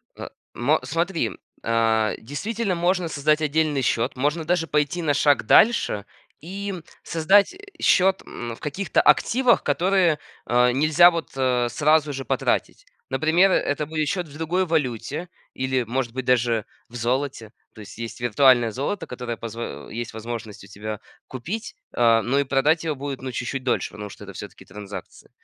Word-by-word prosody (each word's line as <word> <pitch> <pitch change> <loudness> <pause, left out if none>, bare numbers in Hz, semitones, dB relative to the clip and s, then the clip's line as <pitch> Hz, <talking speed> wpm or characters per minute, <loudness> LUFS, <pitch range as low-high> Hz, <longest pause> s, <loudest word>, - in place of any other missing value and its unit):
Э, - - -7 0.3
мо 145 +6 +2
смотри, 165 +6 -1 0.3
а, 115 -1 +2
действительно 200 - -3
можно 175 +1 +1
создать 150 0 +1
отдельный 155 -1 +1
счет, 115 -2 0
можно 150 +5 -1
даже 170 0 0
пойти 150 +3 0
на 150 -3 +1
шаг 145 0 +3
дальше 160 - +4 0.3
и 195 +5 -5 0.3
создать 195 - +3 0.3
счет, 190 +1 +4
м, 120 -1 -6
в - - -19
каких-то 175 +7 0
активах, 250 0 +3
которые, 175 +1 +2 0.3
а, 125 +1 +3
нельзя 155 +6 +6
вот 165 -2 -4 0.4
сразу 150 +2 +2
же 135 0 -5
потратить. - - -1 0.2
Например, 160 +8 +3
это 150 -3 0
будет 155 0 -2
счет 180 -1 -2
в 145 - -15
другой 175 +4 0
валюте 150 0 -2 0.2
или, 130 -1 -1
может 120 0 -3
быть, 130 0 -4
даже 120 -3 +2 0.2
в 120 - -14
золоте. 120 -1 -2 0.2
То - - -15
есть 100 - -12
есть 115 +1 -6
виртуальное 120 0 +4
золото, 140 - -3
которое 120 -2 -5
позв 115 0 -7 0.3
есть 120 0 -5
возможность 110 -2 -7
у - - -15
тебя 105 +1 -6 0.3
купить, 170 - -6 0.2
э, 115 -1 +4
но 135 +3 +1
и - - +3
продать 140 +5 +2
его 155 -2 -1
будет 140 0 -5
чуть-чуть 130 +2 -3
дольше, 125 -2 -1
потому 105 0 -8
что 105 - -11
это 100 - -10
всё-таки 100 +2 -10
транзакции. 105 -1 -10
140 Hz, 160 wpm, -23 LUFS, 120-165 Hz, 0.4 s, нельзя